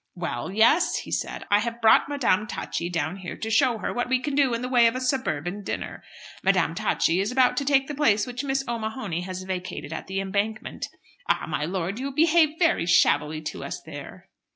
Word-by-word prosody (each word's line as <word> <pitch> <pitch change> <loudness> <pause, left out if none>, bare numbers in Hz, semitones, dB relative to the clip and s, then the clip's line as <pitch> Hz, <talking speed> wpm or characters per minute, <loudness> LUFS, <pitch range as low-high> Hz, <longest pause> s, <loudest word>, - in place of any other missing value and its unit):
"Well, 175 -5 -4
yes," 230 - +4
he - - -7
said, - - -3
"I 205 - +6
have 235 +2 -3
brought 225 +4 +5
Madame 230 -8 +1
Tacchi 170 -4 -4
down 165 +1 -2
here 185 -3 -7
to 220 - -4
show 245 +1 +3
her - - -3
what 245 0 -2
we 260 0 +3
can 285 +2 -3
do 275 -4 +3
in 230 - -4
the - - -2
way 245 -2 +5
of 230 - 0
a - - -1
suburban 205 - -2
dinner. - - -5 0.4
Madame - - +2
Tacchi 170 +2 +1
is 200 +4 0
about 255 -1 +3
to 280 - 0
take 270 -1 +3
the 295 - -4
place 220 -8 +2
which 250 +1 -5
Miss 270 -1 0
O'Mahony 220 -6 -3
has 185 0 -6
vacated 185 -1 -5
at - - -6
'The 190 0 -2
Embankment.' 200 +3 -2 0.4
Ah, - - +1
my 150 - -2
lord, 185 +4 -3
you 275 +2 -3
behaved 315 +1 +3
very 335 - +2
shabbily 155 -3 +3
to - - -5
us - - -5
there." - - -10
220 Hz, 210 wpm, -25 LUFS, 185-265 Hz, 0.4 s, I